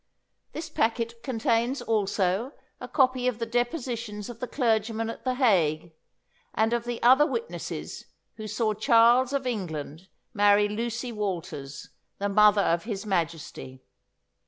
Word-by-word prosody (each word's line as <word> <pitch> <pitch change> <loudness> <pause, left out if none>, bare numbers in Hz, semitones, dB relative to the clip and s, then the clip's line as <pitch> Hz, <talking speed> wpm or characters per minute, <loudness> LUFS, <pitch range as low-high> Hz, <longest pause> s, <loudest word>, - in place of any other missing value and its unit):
This 315 +1 -5
packet 230 -5 -1
contains 240 +1 0
also 205 +2 0 0.3
a - - -7
copy 255 -3 +2
of 250 -3 0
the 230 - -3
depositions 240 -3 -3
of 230 - -13
the 250 - -4
clergyman 225 -3 0
at - - -11
The 255 -1 -1
Hague, 170 - +2 0.6
and 220 +1 +2
of 240 0 -1
the 240 -1 -4
other 265 +5 +6
witnesses 465 +4 -5 0.3
who 215 -1 -6
saw 215 0 0
Charles 235 +4 +4
of 280 -2 -1
England 170 - -4 0.3
marry 205 0 +4
Lucy 235 +3 -3
Walters, 170 -10 -5 0.3
the 200 0 -2
mother 210 0 +5
of 170 +4 0
his 215 -2 -4
Majesty. 165 -8 -3
225 Hz, 135 wpm, -27 LUFS, 200-240 Hz, 0.6 s, other